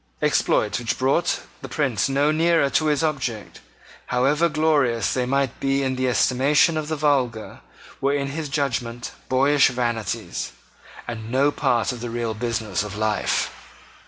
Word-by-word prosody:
Exploits - - +1
which 120 -1 -2
brought 135 +6 +1 0.2
the - - -8
Prince 135 -6 0
no 140 +2 +2
nearer 165 -2 +2
to 155 - +2
his 150 0 +1
object, 130 -9 -3 0.5
however 140 +7 +2
glorious 145 -7 +1
they 125 -1 -1
might 135 -1 0
be 135 0 +1
in 130 -1 -1
the 130 0 0
estimation 135 +7 +3
of 155 -1 -2
the 160 - -2
vulgar, 135 -7 0 0.4
were 140 - +2
in 140 -1 -1
his 150 +1 -4
judgment 125 -5 -2 0.2
boyish 140 +2 +4
vanities, 120 -3 -3 0.5
and 110 -1 -6
no 135 +4 +3
part 125 -6 +1
of 125 -2 -7
the 120 - -4
real 115 -1 -2
business 110 -4 -2
of 105 -1 -6
life. 110 -1 0
130 Hz, 155 wpm, -23 LUFS, 120-145 Hz, 0.5 s, boyish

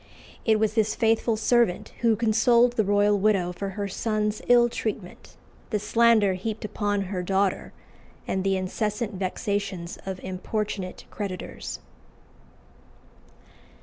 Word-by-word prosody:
It 220 -2 +3
was 215 -1 +1
this 220 -1 +1
faithful 225 0 +2
servant 235 -4 +2
who 230 -2 +3
consoled 235 +2 +3
the 220 - +2
royal 205 0 +3
widow 195 -3 +2
for 195 +2 -4
her 200 -1 -1
son's 210 +1 -1
ill 240 -1 +6
treatment, 215 -5 -6 0.3
the 215 - 0
slander 215 -1 +3
heaped 215 +4 -4
upon 205 -1 -1
her 185 -1 -3
daughter, 195 +1 0 0.6
and 190 - -1
the 195 0 +1
incessant 210 +4 -2
vexations 190 -1 -3
of 190 -1 -5
importunate 190 0 -4
creditors. 195 -3 -5
210 Hz, 120 wpm, -26 LUFS, 195-220 Hz, 0.6 s, ill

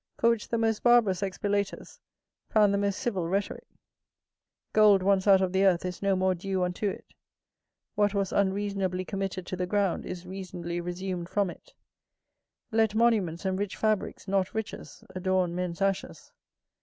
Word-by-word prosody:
For 235 - +4
which 230 -2 -2
the 230 - -1
most 225 -1 0
barbarous 230 -6 +4
expilators 200 +1 -2 0.5
found 210 -2 +4
the 200 - +1
most 200 -1 0
civil 205 -10 -2
rhetorick. 195 +3 -2 1.1
Gold 210 -3 +6
once 195 0 +2
out 195 -1 +7
of 185 -1 -1
the 190 +1 +3
earth 185 -2 +3
is 180 -1 -5
no 200 -1 +2
more 185 0 +2
due 185 +1 -2
unto 180 +3 -1
it; - - -8 0.9
what 205 0 +1
was 195 -1 0
unreasonably 195 -2 0
committed 195 -1 -4
to - - -4
the 180 0 -2
ground, 200 -2 0
is 180 0 -6
reasonably 180 -2 -5
resumed 180 0 -4
from 200 -3 0
it; - - -17 1.0
let 220 -1 +2
monuments 210 -7 +2
and 190 0 0
rich 200 -2 -3
fabricks, 215 -2 -1
not 195 0 0
riches, 220 -1 -6
adorn 185 -1 0
men's 180 +1 -2
ashes. 195 -1 -2
195 Hz, 160 wpm, -28 LUFS, 185-205 Hz, 1.1 s, out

